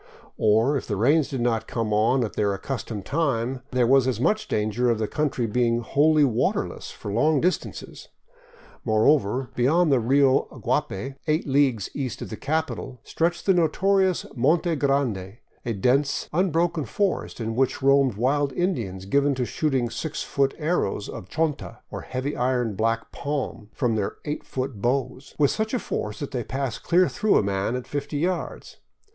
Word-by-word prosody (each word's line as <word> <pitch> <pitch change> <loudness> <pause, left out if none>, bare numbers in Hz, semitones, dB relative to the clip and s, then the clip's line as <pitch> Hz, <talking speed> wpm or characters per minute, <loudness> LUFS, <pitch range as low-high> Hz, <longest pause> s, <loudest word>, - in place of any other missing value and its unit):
Or, 110 +7 +3
if - - -6
the 105 - -1
rains 140 +9 +3
did 130 -3 -3
not 115 -2 0
come 115 -3 -2
on 115 +5 +3
at 110 - -4
their 100 -1 0
accustomed 110 -2 -5
time, 130 -4 -1
there 125 -2 +2
was 130 +1 +4
as 125 -4 0
much 215 - +1
danger 110 +3 0
of 115 - +2
the 110 -1 -1
country 145 -4 -1
being 120 +1 +1
wholly 150 +5 +3
waterless 120 -5 0
for 100 - -7
long 150 +6 +3
distances. 180 +5 -3 0.8
Moreover, 120 +2 +2
beyond 155 +6 +3
the 135 - +4
Rio 135 +3 +3 0.2
Guapay, 135 +8 -2
eight 155 +1 +1
leagues 135 -7 +2
east 130 -4 -4
of - - -9
the - - -3
capital, 140 0 -3
stretched 170 +1 -1
the 195 - +5
notorious 185 +2 +2
Monte 160 +6 +2
Grande, 125 -9 0 0.3
a 115 - 0
dense, 130 +8 +1
unbroken 170 -2 +1
forest 195 - -2
in 115 -1 -2
which 130 +2 0
roamed 135 -4 +4
wild 135 +5 +1
Indians 115 - -2
given 140 +6 +2
to 125 -1 -1
shooting 130 -5 -1
six 145 +6 -4
foot 140 -1 0
airrows 150 - -1
of 90 - -8
chonta, 160 -3 -2
or - - -6
iron - - -19
heavy 125 -4 -1
black 115 +3 -1
palm, 140 -7 -4
from 125 -4 0
their 105 -3 -2
eight 150 0 -3
foot 130 -5 -5
bows, 130 +2 -2
with 145 -2 +3
such 220 +3 -1
force 105 - -3
that 145 - -5
they 125 -3 -2
pass 130 -2 -3
clear 180 +1 +3
through 215 -1 +2
a - - +2
man 100 +4 -1
at 125 - -4
fifty 145 +1 -4
yards. 180 +5 -3
130 Hz, 170 wpm, -25 LUFS, 115-150 Hz, 0.8 s, the